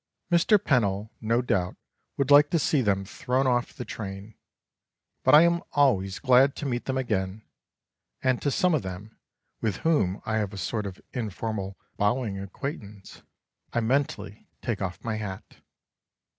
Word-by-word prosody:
Mr. 175 +5 +5
Pennell 110 - 0
no 115 +2 +1
doubt 90 -6 0 0.4
would 140 0 0
like 145 +1 +8
to 170 - +2
see 150 -2 +2
them 100 -4 +1
thrown 130 +7 -1
off 120 -2 +1
the 125 - -7
train, 100 -1 -7 0.9
but - - +7
I 155 - +9
am 170 0 +3
always 100 -10 +2
glad 130 0 +4
to - - -5
meet 120 -3 -2
them 130 0 -1
again, 105 -4 -2 0.8
and 130 -1 +2
to 145 - +1
some 180 +4 +2
of 150 - +2
them, 95 +4 -8 0.4
with 105 -5 -1
whom 125 - +2
I 110 0 0
have 105 -2 -2
a - - -7
sort 105 +1 -2
of 95 -1 -8
informal 105 -3 -4 0.2
bowing 105 -1 0
acquaintance, 100 - -7 0.5
I 120 - +1
mentally 125 -3 -1 0.2
take 115 -4 -2
off 95 -2 -4
my 115 -2 -2
hat. 100 -3 -7
115 Hz, 155 wpm, -27 LUFS, 100-135 Hz, 0.9 s, I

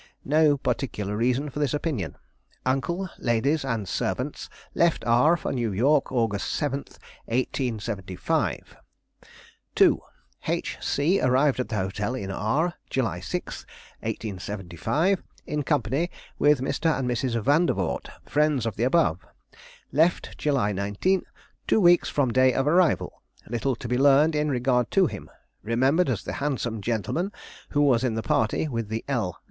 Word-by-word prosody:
No 150 0 +4
particular 105 -7 -2
reason 125 +6 0
for 145 - -5
this 145 -2 +1
opinion. 145 - -3 0.5
Uncle, 135 +9 0
ladies, 135 +6 +1
and 115 -7 -2
servants - - -3 0.2
left 170 -1 +2
R 125 +9 +4
for - - -3
New 120 -4 -1
York, 135 +9 +2
August 115 -5 0
7, 140 -2 -1 0.5
1875. 110 -7 -2 1.0
"2. - - +5 0.5
H. - - -2
C. 165 +8 +1
arrived 130 +2 +3
at 125 - -2
the 110 - -2
hotel 100 +4 -2
in 95 -6 -4
R 140 - 0 0.2
July 110 -9 -1
6, - - -5 0.4
1875, 105 - -2 0.2
in 150 - -2
company 145 +3 0 0.3
with 145 -3 +4
Mr. 160 +3 0
and 130 -2 -2
Mrs. 120 0 0
Vandervort, 135 - +1 0.2
friends 150 -5 +1
of 110 -4 -3
the 115 - 0
above. 130 - +3 0.7
Left 160 +6 +1
July 135 -8 +1
19, 100 - 0 0.4
two - - +4
weeks 175 -3 +5
from 130 -5 +1
day 130 0 +4
of 135 - +1
arrival. 170 +2 +2 0.3
Little 120 +3 -1
to 120 - -7
be 125 +1 0
learned 145 +3 +5
in 150 0 0
regard 125 -2 +1
to 190 - +7
him. - - -6 0.3
Remembered 130 +9 +2
as 105 -6 -1
the - - -5
handsome 125 -6 -2
gentleman 120 - -1 0.4
who 145 - +1
was 130 -4 +4
in 120 -4 0
the 110 - -2
party 110 +8 +1
with 115 -6 -3
the 110 +1 -3
L. 110 -11 -1
130 Hz, 145 wpm, -26 LUFS, 110-150 Hz, 1.0 s, to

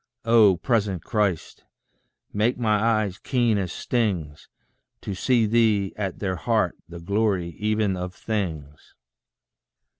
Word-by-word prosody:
Oh, 110 -5 +5
present 100 -2 0
Christ! 105 - -2 0.7
make 110 +4 +1
my 110 -3 +1
eyes 110 -4 +1
keen 120 -5 +1
as 90 -3 -3
stings, 90 -14 -2 0.5
To 100 - -5
see 115 +4 +2
thee 110 -3 +2
at 95 -3 -4
their 95 -3 -2
heart, 110 -3 0
the 85 0 -9
glory 100 -1 0
even 105 -2 0
of 90 0 -5
things. 80 -10 -5
105 Hz, 120 wpm, -24 LUFS, 90-110 Hz, 0.7 s, Oh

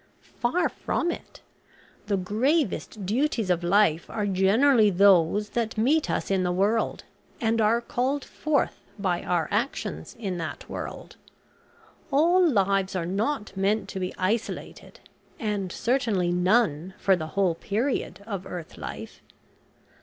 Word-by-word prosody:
"Far 255 +9 +2
from 345 - -2
it. - - -9 0.7
The 200 -2 +1
gravest 220 - 0
duties 225 -2 0
of 175 -1 0
life 175 -3 +3
are 210 -2 -2
generally 210 +5 +4
those 195 +1 +4
that 230 -2 -2
meet 285 +8 +2
us - - -1
in 190 -1 +2
the 180 -1 0
world, 205 +5 0 0.4
and 225 0 +1
are 225 +2 +3
called 260 +4 -1
forth 305 -3 -1 0.2
by 185 -4 -1
our 175 -3 0
actions 230 +7 -2
in 195 -6 -3
that 160 -2 -6
world. - - -7 0.9
All 340 +6 +4
lives 195 - +2
are 175 -2 -1
not 210 +4 -2
meant 195 +1 +1
to 190 - -5
be 185 -1 -2
isolated, 215 +5 -3 0.4
and 205 -4 -2
certainly 220 -9 0
none 180 -2 +1
for 195 -1 +3
the 160 -3 -5
whole 190 -4 +3
period 200 +1 -2
of 195 -4 -5
earth 175 -4 -8
life. - - -8
205 Hz, 135 wpm, -26 LUFS, 185-235 Hz, 0.9 s, generally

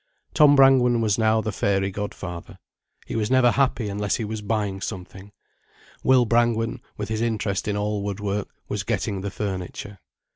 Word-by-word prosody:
Tom 145 -1 +6
Brangwen 130 -3 +5
was 110 -1 +1
now 110 0 +3
the 110 - -3
fairy 95 0 0
godfather. 95 -3 -6 0.5
He - - -6
was 110 -1 0
never 130 -2 +5
happy 130 -4 +1
unless 100 0 -1
he 115 - -3
was 110 0 -5
buying 105 -2 -2
something. 95 0 -7 0.7
Will 130 -2 +4
Brangwen, 115 0 +1 0.2
with 105 0 -4
his 110 0 -2
interest 105 -4 -1
in 105 -1 -1
all 105 0 -1
wood 100 0 -4
work, 105 -1 -2 0.2
was - - -2
getting 100 -2 -2
the 100 - -3
furniture. 100 0 -5
105 Hz, 170 wpm, -24 LUFS, 100-115 Hz, 0.7 s, Tom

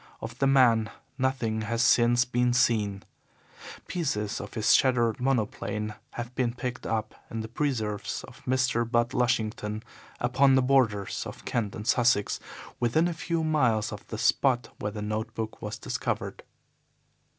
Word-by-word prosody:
Of 120 +2 -8
the 135 - +3
man 120 -5 +4 0.3
nothing 130 -4 0
has 115 +2 0
since 120 +1 +4
been 125 0 +1
seen. 105 -5 +1 0.8
Pieces 110 - -2
of - - -9
his 110 -2 +4
shattered 120 -2 +3
monoplane 105 -4 -1 0.2
have 120 +1 -6
been 125 -2 -1
picked 125 0 -4
up 110 -1 -2 0.2
in 115 - -4
the 110 - -5
preserves 115 -5 -2
of - - -13
Mr. 130 -2 +2
Budd 120 0 +1
Lushington 110 -3 0 0.4
upon 130 +2 +4
the 130 - +4
borders 120 -7 +2
of - - -10
Kent 105 -5 -1
and 105 - -6
Sussex, 120 -4 +2 0.4
within 125 +8 +2
a 175 - -2
few 165 0 -2
miles 125 -10 +2
of 105 -1 -8
the 110 - -5
spot 125 0 +2
where 105 - -2
the 105 0 -5
note 110 +1 -3
book 110 -1 -5
was 105 0 -5
discovered. - - -3
120 Hz, 150 wpm, -28 LUFS, 110-130 Hz, 0.8 s, man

